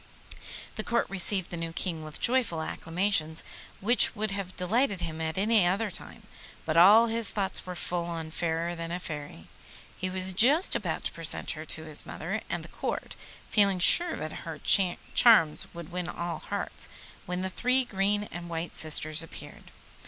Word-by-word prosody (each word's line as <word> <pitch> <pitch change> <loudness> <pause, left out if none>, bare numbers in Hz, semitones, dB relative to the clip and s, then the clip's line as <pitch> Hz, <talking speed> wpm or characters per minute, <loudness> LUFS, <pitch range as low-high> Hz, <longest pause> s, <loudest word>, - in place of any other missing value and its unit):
The 215 - -3
Court 235 +1 -1
received 190 -1 +1
the 175 - -5
new 165 0 -6
King 165 -2 -3
with 155 -1 -9
joyful 240 -9 +2
acclamations 165 -2 -1 0.4
which 235 +5 +6
would 215 -1 -2
have 195 -2 -6
delighted 200 +1 0
him 160 0 -5
at 160 +1 -4
any 215 +1 +3
other 200 +3 -1
time, - - -11 0.4
but 155 - -2
all 205 +7 +7
his 230 -1 -1
thoughts 195 -2 -3
were 180 - -6
full 175 0 -3
of 160 -1 -8
Fairer 170 +1 -2
than 165 0 -6
a 175 - -3
Fairy. 145 - -8 0.5
He 185 - -4
was 185 0 +2
just 275 - +4
about - - -3
to - - -3
present - - -1
her - - -7
to - - -2
his - - -4
mother - - -5
and - - -4
the - - -10
Court, - - -5 0.3
feeling 200 -3 +2
sure 340 - +8
that 155 - -6
her 160 -3 -8 0.5
charms 165 -11 +5
would 170 0 -10
win 180 -1 -4
all 170 -2 -5
hearts, - - 0 0.4
when 180 +1 -3
the 190 - -3
three 255 +5 +1
green 205 0 -1
and 175 0 -8
white 165 0 -5
sisters 155 0 0
appeared. 165 - -11
180 Hz, 175 wpm, -27 LUFS, 165-205 Hz, 0.5 s, sure